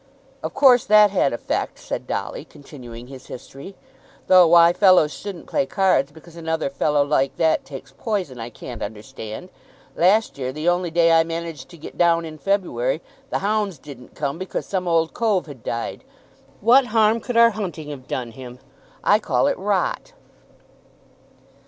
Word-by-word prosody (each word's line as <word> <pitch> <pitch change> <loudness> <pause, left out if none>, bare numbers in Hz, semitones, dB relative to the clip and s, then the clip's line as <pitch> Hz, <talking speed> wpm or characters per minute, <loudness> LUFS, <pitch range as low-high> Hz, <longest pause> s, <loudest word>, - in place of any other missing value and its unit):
"Of - - -6
course 255 -4 +6
that 210 -1 +6
had 185 -8 +2
effect," 120 - -3
said - - -6
Dolly, - - -4
continuing 120 -5 -12
his 130 0 -12
history. 135 +9 -10 0.5
"Though 185 -2 +7
why 170 0 +6
fellows 185 -5 +4
shouldn't 200 -4 -8
play 185 - -1
cards 185 -9 +1
because 160 +2 -16
another 160 -3 -2
fellow 145 +1 +1
like 135 -2 0
that 160 -1 +1
takes 135 -2 -10
poison, 185 - -3
I 115 +1 -6
can't 120 0 -9
understand. 110 - -8 0.5
Last 195 -1 +2
year 130 -1 -3
the 155 +5 -5
only 175 0 +1
day 165 0 +3
I 165 0 +5
managed 165 -1 -6
to 170 - -13
get 155 - -11
down 170 -1 +3
in 155 -1 -9
February, 150 -7 -1 0.3
the - - -1
hounds 205 -4 0
didn't 130 -3 -13
come 145 +2 -3
because 185 - -4
some 185 -2 -3
old 165 -1 +1
cove 215 -6 0
had 140 -6 -11
died. 115 - -4 0.6
What 250 +5 +5
harm 220 0 +3
could 240 +1 -4
our 235 0 +7
hunting 175 -8 -6
have 135 -3 -9
done 120 -2 -4
him? 125 +1 -10 0.5
I - - +4
call - - 0
that - - 0
rot." - - -1
165 Hz, 165 wpm, -22 LUFS, 135-190 Hz, 0.6 s, Though